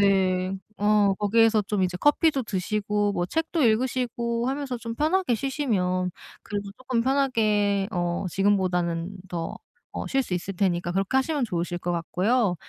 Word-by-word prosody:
네 190 -2 +2 0.3
어 205 -1 +4
거기에서 220 +1 +4
좀 200 -1 -1
이제 180 -1 0
커피도 290 - +3
드시고 205 0 -1
뭐 175 -2 -1
책도 320 - -1
읽으시고 235 0 0
하면서 270 -2 -2
좀 230 0 -5
편하게 310 0 +1
쉬시면 205 -9 0 0.3
그래도 205 -2 -4
쪼끔 255 -2 -1
편하게 215 -7 +2
어 175 0 -1
지금보다는 180 -2 0
더 170 -2 -4 0.4
어 - - -4
쉴 270 0 +1
수 190 -7 -3
있을 185 +2 -4
테니까 175 -2 0
그렇게 195 +6 0
하시면 275 +1 +1
좋으실 175 -4 -2
것 175 - -3
같고요. 185 +5 +1
205 Hz, 320 characters per minute, -25 LUFS, 185-250 Hz, 0.4 s, 어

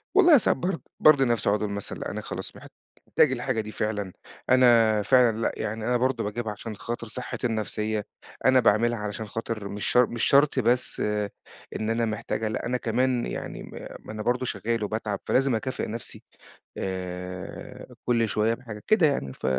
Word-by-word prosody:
والله 350 -6 +8
ساعات 235 - +2
برض 180 -1 -2 0.2
بارضِي 145 -3 +6
نفسي، 120 -5 +1
أقعُد 105 +1 +2
أقول 105 -1 -1
مثلًا: 100 0 -5
"أنا - - -4
خلاص - - -6
محتاج - - -1
الحاجة 130 -4 -1
دي 110 0 -8
فعلًا، 105 -4 -2 0.4
أنا 115 -4 +5
فعلًا، 120 0 +4
لأ 115 - 0
يعني 110 +1 -3
أنا 125 0 +3
برضه 130 +1 0
باجيبها 110 +2 -3
عشان 105 +1 -7
خاطر 115 +3 -5
صحتي 125 +2 -3
النفسية، 110 -1 -2 0.4
أنا 130 0 +6
باعملها 115 +1 +3
علشان 105 +1 -4
خاطِر 115 -2 -4
مش 100 0 -4
شر 125 0 +5
مش 120 - -3
شرط 140 -1 +4
بس 125 +1 +2
آآ، 105 -1 0 0.5
إن 110 - -2
أنا 115 +1 +1
محتاجها، 110 0 -2
لأ، 110 - -3
أنا 125 +1 0
كمان 125 +1 0
يعني - - -5
م - - -11 0.3
ما - - -7
أنا 110 - -5
برضه 125 +1 0
شغّال 115 -1 -2
وباتعَب، 105 -1 -2
فلازم 135 -1 +2
أكافِئ 130 +4 -3
نفسي 115 +2 -6 0.5
آآ، 90 -1 -6
كل 115 -2 +2
شوية 110 +2 +2
بحاجة، 115 -4 -8
كده 215 -7 +5
يعني." 70 - -2
ف - - -21
115 Hz, 180 wpm, -26 LUFS, 105-125 Hz, 0.5 s, والله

